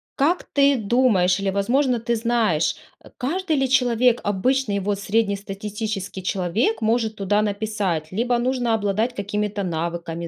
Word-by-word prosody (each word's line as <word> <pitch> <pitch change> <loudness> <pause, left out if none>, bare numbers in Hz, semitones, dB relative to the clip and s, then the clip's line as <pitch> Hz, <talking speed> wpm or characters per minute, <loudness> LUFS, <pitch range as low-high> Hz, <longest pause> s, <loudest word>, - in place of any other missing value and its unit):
как 325 +6 +1
ты 280 -1 +3
думаешь, 200 -5 +2
или, 195 0 -1
возможно, 240 +5 +1
ты 235 +1 -1
знаешь 220 -9 +1 0.4
каждый 325 +5 -1
ли 270 -1 +1
человек 245 -2 +3
обычный 205 +2 0
вот, 200 +1 -2
среднестатистический 200 -1 -3
человек 195 +6 0
может 220 0 +1
туда 205 +1 +1
написать, 200 -6 -2
либо 240 +4 0
нужно 245 -1 0
обладать 215 +3 0
какими-то 205 0 -2
навыками, 170 -1 -3
215 Hz, 130 wpm, -22 LUFS, 195-245 Hz, 0.4 s, ты